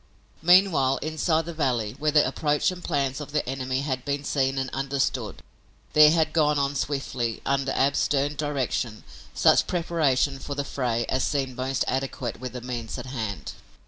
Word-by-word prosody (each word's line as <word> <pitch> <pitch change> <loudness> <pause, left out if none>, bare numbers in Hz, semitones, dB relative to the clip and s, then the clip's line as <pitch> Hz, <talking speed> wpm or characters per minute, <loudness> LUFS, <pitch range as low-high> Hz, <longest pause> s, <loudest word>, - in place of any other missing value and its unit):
Meanwhile, 165 -6 +4
inside 160 +1 0
the 170 - -6
valley, 125 -8 -1
where 155 +1 +1
the 150 0 +4
approach 150 +4 +1
and 180 -1 -9
plans 140 -3 -1
of 145 0 -8
the 150 - 0
enemy 130 0 -2
had 130 -3 -3
been 140 0 -2
seen 135 -2 0
and 130 -1 -2
understood, 135 +1 -2 0.5
there 150 0 +8
had 160 -1 +2
gone 150 -2 +3
on 140 0 0
swiftly, 130 -4 -2
under 135 0 0
Ab's 140 +1 +2
stern 145 +1 +1
direction, 135 -6 -2 0.3
such - - +4
preparation 150 -6 +1
for 140 - -5
the 140 0 -2
fray 120 -4 -1
as 130 - 0
seemed 135 -3 -1
most 130 +2 -1
adequate 130 -2 -3
with 125 0 -6
the 125 - -6
means 120 -2 -5
at - - -6
hand. 115 -6 -4
140 Hz, 175 wpm, -25 LUFS, 130-150 Hz, 0.5 s, there